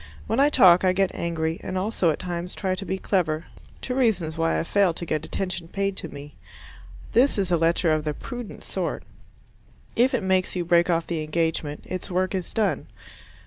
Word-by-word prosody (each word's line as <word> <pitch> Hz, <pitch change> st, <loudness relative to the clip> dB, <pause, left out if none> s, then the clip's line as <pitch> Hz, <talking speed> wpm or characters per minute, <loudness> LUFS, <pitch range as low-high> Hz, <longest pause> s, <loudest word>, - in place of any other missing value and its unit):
When 225 Hz, -, 0 dB
I 285 Hz, +1 st, +6 dB
talk 185 Hz, -11 st, +6 dB
I 185 Hz, -1 st, +4 dB
get 190 Hz, 0 st, +1 dB
angry, 165 Hz, 0 st, -2 dB
and 185 Hz, -, -4 dB
also 190 Hz, -2 st, +1 dB
at 155 Hz, -, 0 dB
times 175 Hz, 0 st, -5 dB
try 190 Hz, -2 st, -1 dB
to 195 Hz, +1 st, -1 dB
be 190 Hz, -, -1 dB
clever 165 Hz, -5 st, 0 dB, 0.4 s
two 250 Hz, -, -2 dB
reasons 205 Hz, -11 st, +1 dB
why 165 Hz, 0 st, +1 dB
I -, -, 0 dB
fail 185 Hz, -1 st, +2 dB
to 170 Hz, -, -5 dB
get 155 Hz, -2 st, -1 dB
attention 180 Hz, -2 st, -3 dB
paid 195 Hz, +2 st, -2 dB
to -, -, -4 dB
me. 145 Hz, +1 st, -10 dB, 0.8 s
This 255 Hz, +2 st, +3 dB
is 190 Hz, -3 st, 0 dB
a -, -, +5 dB
letter 165 Hz, 0 st, +2 dB
of 155 Hz, -1 st, 0 dB
the 150 Hz, -1 st, -2 dB
prudent 245 Hz, -, -7 dB
sort. -, -, -3 dB, 0.9 s
If 255 Hz, +3 st, +3 dB
it 225 Hz, -, -1 dB
makes 190 Hz, -1 st, +1 dB
you 175 Hz, -1 st, -1 dB
break 170 Hz, +1 st, +4 dB
off 170 Hz, -1 st, +1 dB
the 165 Hz, -2 st, -2 dB
engagement, 155 Hz, -1 st, -2 dB
its 185 Hz, -, -5 dB
work 185 Hz, +1 st, 0 dB
is 185 Hz, -2 st, -3 dB
done. 200 Hz, -10 st, 0 dB
180 Hz, 200 wpm, -25 LUFS, 165-195 Hz, 0.9 s, I